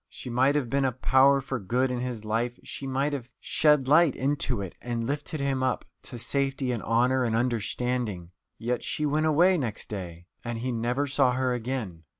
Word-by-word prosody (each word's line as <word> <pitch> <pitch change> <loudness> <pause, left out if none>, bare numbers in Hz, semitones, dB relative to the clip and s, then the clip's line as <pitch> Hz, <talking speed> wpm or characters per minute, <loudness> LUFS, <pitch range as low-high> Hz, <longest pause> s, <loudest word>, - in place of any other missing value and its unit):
She 125 - -8
might 130 +4 +3
have 145 -4 +1
been 140 +3 +1
a 130 - +2
power 135 +2 +4
for 130 -1 -4
good 125 +6 0
in 125 - -2
his 120 -3 -4
life, 120 +3 -1
she 135 - -6
might 135 +2 0
have 125 -3 -5
shed 150 -4 +3
light 155 0 +5
into 135 -4 0
it 95 -3 -5
and 120 -1 -3
lifted 145 +3 -3
him 135 -1 0
up 130 -1 0 0.2
to 125 - -9
safety 135 +2 -1
and 120 -3 -2
honour 125 +3 +2
and 115 -2 0
understanding. 115 -5 -1 0.3
Yet 120 +1 -2
she 150 - -2
went 155 +2 +1
away 175 +4 +4
next 115 -6 -4
day, 85 -4 -6 0.2
and 120 -1 -4
he 125 +3 -2
never 120 +4 0
saw 135 -2 +2
her 130 0 0
again. 115 -9 -4
125 Hz, 195 wpm, -27 LUFS, 115-140 Hz, 0.3 s, light